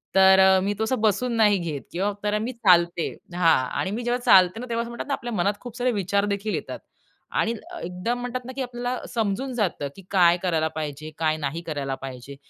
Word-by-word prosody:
तर 190 0 +7 0.2
मी 205 +1 0
तो - - +1
असं 240 -1 -1
बसून 225 +3 +1
नाही 210 -2 +5
घेत 160 -5 -4
किंवा 195 +4 0
तर 210 0 +1
मी 235 +4 -3
चालते 175 -6 +3 0.3
हां 170 -2 +4 0.2
आणि 190 - -1
मी 235 +3 -3
जेव्हा 240 +1 0
चालते 185 +3 +6
ना 250 - -5
तेव्हा 230 0 0
असं 235 - -8
म्हणतात 235 - -6
ना 280 - -1
आपल्या 240 -3 -4
मनात 200 +2 +1
खूप 245 -1 -9
सारे 250 0 +1
विचार 200 -1 0
देखील 205 +1 -2
येतात - - -5 0.6
आणि 230 - +1 0.3
एकदम 180 +8 -3
म्हणतात 245 0 -4
ना 255 - -6
की 275 - -3
आपल्याला 245 0 -3
समजून 230 +4 -2
जातं, 185 -10 -1
की 195 - -11
काय 175 -3 +5
करायला 160 -3 +1
पाहिजे, 155 0 -5
काय 155 -1 +1
नाही 150 +2 -3
करायला 140 -3 -3
पाहिजे. 135 +1 -9
200 Hz, 210 wpm, -24 LUFS, 170-235 Hz, 0.6 s, तर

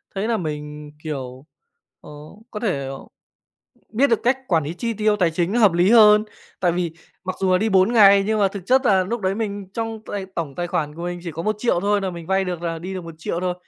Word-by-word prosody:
thấy 200 +3 -1
là 230 -2 +1
mình, 150 -2 -6
kiểu, 135 -3 -6 0.6
ờ, - - -13 0.4
có 210 - -5
thể, 190 -11 -1
ờ, 135 0 -6 0.9
biết 265 +6 +3
được 230 - +2
cách 250 +2 +2
quản 165 -4 +2
lý 160 +4 -5
chi 230 +4 -3
tiêu 215 0 +1
tài 175 -4 +2
chính 175 +4 -1
nó 240 - +1
hợp 205 -5 +6
lý 175 +4 +3
hơn. 210 -2 +7 0.4
Tại 175 -2 +2
vì 175 -2 -2 0.3
mặc 185 0 -4
dù 185 -1 +2
là 180 - +4
đi 220 +2 0
4 190 +3 +3
ngày 200 -3 +7
nhưng 220 0 +1
mà 195 - +4
thực 195 -2 -9
chất 260 0 +3
là 190 -3 +4
núc 230 +4 -3
đấy 190 +1 0
mình 200 -3 -4
trong 225 -1 -4
tài 195 -2 -5
tổng 150 -5 -4
tài 175 0 -3
khoản 155 -4 -2
của 170 - -8
mình 175 0 -4
chỉ 170 - -4
có 165 +2 -5
1.000.000 215 -2 0
thôi 205 +1 +1
nà 190 -1 -2
mình 170 -2 -9
vay 190 0 +1
được 175 -2 -4
là 165 -1 -3
đi 185 +3 -6
được 180 -2 -6
1.000.000 165 +1 -5
thôi. 180 -1 -1
185 Hz, 250 wpm, -22 LUFS, 170-210 Hz, 0.9 s, hơn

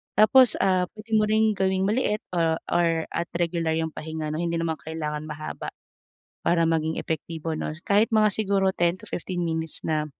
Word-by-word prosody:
Tapos, 220 +3 +6
ah, 185 -1 +3
pwede 215 +1 -13
mo 215 - +3
rin 215 0 +2
gawing 190 0 +1
maliit 215 -1 +1 0.2
o 165 -1 +2
or 165 -2 +2
at 170 - -3
regular 170 -1 0
'yung 160 0 -1
pahinga 160 0 -5
'no. 155 - -3
Hindi 170 -1 -1
naman 160 -1 -1
kailangan 155 -1 -4
mahaba 155 0 -6 0.8
para 170 -1 +3
maging 160 0 0
epektibo 160 0 -4
'no, 155 - -3
kahit 210 +3 +3
mga 215 -1 +5
siguro 195 -2 +2
10-15 175 +1 -2
minutes 160 -1 -2
na 155 -1 0
170 Hz, 165 wpm, -25 LUFS, 160-200 Hz, 0.8 s, Tapos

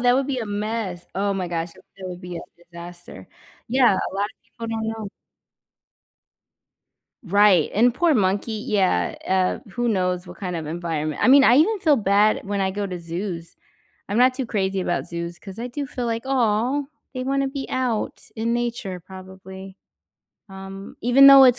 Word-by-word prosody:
that 245 0 +4
would 270 +1 +1
be 265 -3 -2
a 225 - -3
mess, 205 -3 -3
oh, 200 +1 0
my 185 -2 -2
gosh, 170 0 -3
that - - -19 0.3
would 180 0 -7
be 180 -1 -7
a - - -5 0.2
disaster. 175 0 -12 0.4
Yeah, 250 -2 +5
a 190 - -3
lot 200 +1 0
of 215 - -9
people 230 0 -9
don't 220 0 -2
know. 220 -2 -4 2.2
Right, 200 -3 +4
and 235 +3 +4
poor 335 +2 +3
monkey, 210 +1 0
yeah, 185 - +1
uh, 185 -1 +2
who 240 +4 -2
knows 180 -3 0
what - - -11
kind 180 -3 -3
of 160 - -5
environment 155 -2 -3
I - - +4
mean, 275 +1 +8
I 245 - +6
even 405 +8 +4
feel 320 -6 +4
bad 205 0 +3
when 200 0 -2
I 190 0 0
go 205 +1 -2
to 180 -2 -4
zoos. 170 0 -5 0.5
I'm 205 +4 0
not 255 +1 +5
too 265 -2 -2
crazy 195 -3 -1
about 175 - -1
zoos 170 0 -5
'cause 195 0 -10
I 235 - -4
do 280 +2 -5
feel 250 -2 -4
like, 230 +1 -2
"Aw, 250 +2 +1 0.3
they 255 - -2
wanna 275 +1 0
be 270 0 -4
out, 250 -4 -1
in 230 +1 -1
nature 235 -6 -3
probably," 190 +1 -11 0.7
um, 195 +1 -9
even 250 +4 +7
though 275 -1 +10
it's 250 -1 +5
205 Hz, 185 wpm, -23 LUFS, 185-240 Hz, 2.2 s, though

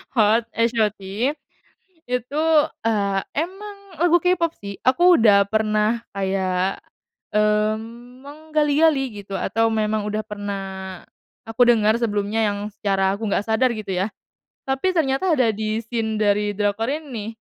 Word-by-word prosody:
hot 225 +1 +3
H.O.T 225 -3 +1 1.1
itu, 250 +5 -2 0.4
eee, 200 -3 +1 0.2
emang 390 +6 -4 0.2
lagu 345 0 +4
K-pop 340 -2 +1
sih 200 -1 -9
aku 350 +7 +5
udah 205 -3 +6
pernah 220 +1 0
kayak, 190 -1 -1 0.6
mmm, 220 +4 -1
menggali-gali 295 -1 +1
gitu 195 0 -8
atau 225 +3 0
memang 215 -1 0
udah 215 +1 -2
pernah, 195 -3 -6 0.4
aku 225 +2 +2
dengar 220 -2 +4
sebelumnya 215 -1 0
yang 205 0 -3
secara 195 -2 0
aku 225 - -4
nggak 205 - 0
sadar 235 +2 +1
gitu 215 -2 -6
ya, 185 +2 0 0.6
tapi 270 +8 0
ternyata 325 +1 +1
ada 235 -4 +3
di 215 +1 -2
scene 225 -1 -3
dari 205 0 +2
drakor 205 +2 -1
ini, 260 -8 -5
220 Hz, 125 wpm, -22 LUFS, 205-255 Hz, 1.1 s, udah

